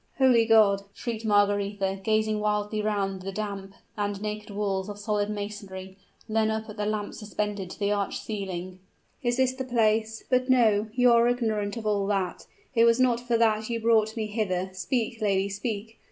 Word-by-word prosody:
"Holy 250 -4 +5
God!" 210 -3 +5
shrieked 230 -2 -4
Margaretha, 205 -2 +1
gazing 215 0 +1
wildly 210 0 0
round 200 -3 -1
the 195 +1 -5
damp 195 -1 -5 0.2
and 205 -1 -2
naked 210 0 -5
walls 200 -1 -2
of 205 - -6
solid 205 0 -1
masonry, 200 -2 -6 0.3
and 220 - -5
then 220 -1 +3
up 220 0 -2
at 210 0 -9
the 210 0 -1
lamp 210 -1 -2
suspended 210 -2 -4
to - - -9
the 205 -1 0
arched 205 -1 -1
ceiling, 185 -3 -5 0.4
"is 240 -1 0
this 260 -1 +2
the 260 0 -4
place? 225 -2 +1
But 255 0 +1
no! 220 -4 +4
you 245 -1 +5
are 235 0 +5
ignorant 220 -3 0
of 225 - -6
all 205 -2 +1
that; 195 -3 -2 0.3
it 230 -2 +5
was 230 +1 +4
not 250 -2 +3
for 240 -1 0
that 220 -1 +2
you 230 -1 -1
brought 220 -1 +2
me 220 - -1
hither! 190 -4 -2
Speak, 225 +5 -2
lady, 200 -1 +1
speak! 215 +2 -5
210 Hz, 185 wpm, -27 LUFS, 200-225 Hz, 0.4 s, Holy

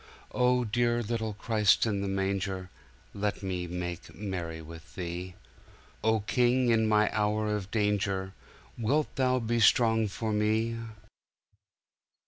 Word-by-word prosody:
'"O 125 0 +2
dear 120 +2 +1
little 110 -1 -2
Christ 110 0 +3
in 100 -3 -1
the 100 - -2
manger, 95 -1 -2 0.4
Let 105 0 -2
me 90 -2 -2
make 90 0 -5
merry 90 -5 -4
with 80 +1 -12
Thee.O 90 +5 -4
King, 125 +3 +2
in 110 -1 +3
my 105 0 +3
hour 105 0 +1
of 100 -2 -5
danger, 100 -3 0 0.5
Wilt 145 +7 0
Thou 130 -1 +2
be 120 -1 0
strong 110 0 +4
for 110 +2 -3
me?" 110 +2 +1
105 Hz, 120 wpm, -29 LUFS, 95-115 Hz, 0.5 s, strong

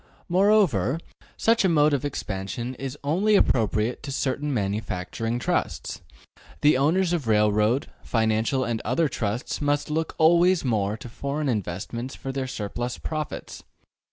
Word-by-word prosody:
Moreover, 180 - +3 0.4
such 230 -1 +3
a 190 - +4
mode 150 -2 +4
of 140 - 0
expansion 115 -2 -4
is 135 +1 -5
only 190 +9 +2
appropriate 110 - +2
to 145 - -6
certain 140 +2 -1
manufacturing 105 0 -2
trusts: 120 - -2 0.6
the 145 -1 +5
owners 165 +7 +2
of 155 -9 -1
railroad, 105 +3 +3 0.2
financial 110 +3 +1
and 115 -2 -2
other 130 +8 +1
trusts 115 0 -3
must 145 +1 0
look 160 +1 -1
always 170 +1 +4
more 105 -3 0
to 120 - -9
foreign 140 +5 -3
investments 115 +4 -3
for 135 - -5
their 135 -1 -3
surplus 120 +2 -4
profits. 155 -1 -5
130 Hz, 135 wpm, -25 LUFS, 110-150 Hz, 0.6 s, the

